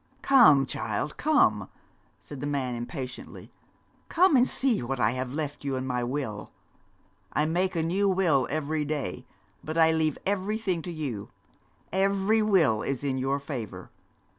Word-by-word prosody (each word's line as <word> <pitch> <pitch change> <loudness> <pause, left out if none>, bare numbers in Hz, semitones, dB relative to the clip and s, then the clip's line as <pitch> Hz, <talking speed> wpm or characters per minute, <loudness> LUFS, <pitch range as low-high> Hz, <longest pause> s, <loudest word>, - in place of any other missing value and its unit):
'Come, 220 - +6
child, 110 +3 -3
come!' 310 -1 +2 0.5
said 145 -3 -10
the 145 - -3
man 135 -4 -2
impatiently. 125 +2 -7 0.6
'Come 360 -2 +4
and 255 0 +5
see 260 -5 +1
what 130 +2 -3
I - - +3
have 125 0 -4
left 145 0 -4
you 140 -1 -2
in 130 0 -3
my 125 -1 -1
will. 120 -5 -4 0.8
I 150 - +2
make 180 +4 0
a 165 - +1
new 195 +5 +1
will 170 -9 +2
every 155 +1 -1
day, 145 -9 -4 0.4
but 155 +1 -5
I 160 -1 +5
leave 160 -2 0
everything 200 -2 -1
to 175 - -6
you 135 -11 -5 0.6
every 195 +3 +2
will 170 - +3
is 135 0 -3
in 135 -2 -1
your 135 +2 0
favour. 115 - -7
150 Hz, 155 wpm, -27 LUFS, 130-190 Hz, 0.8 s, Come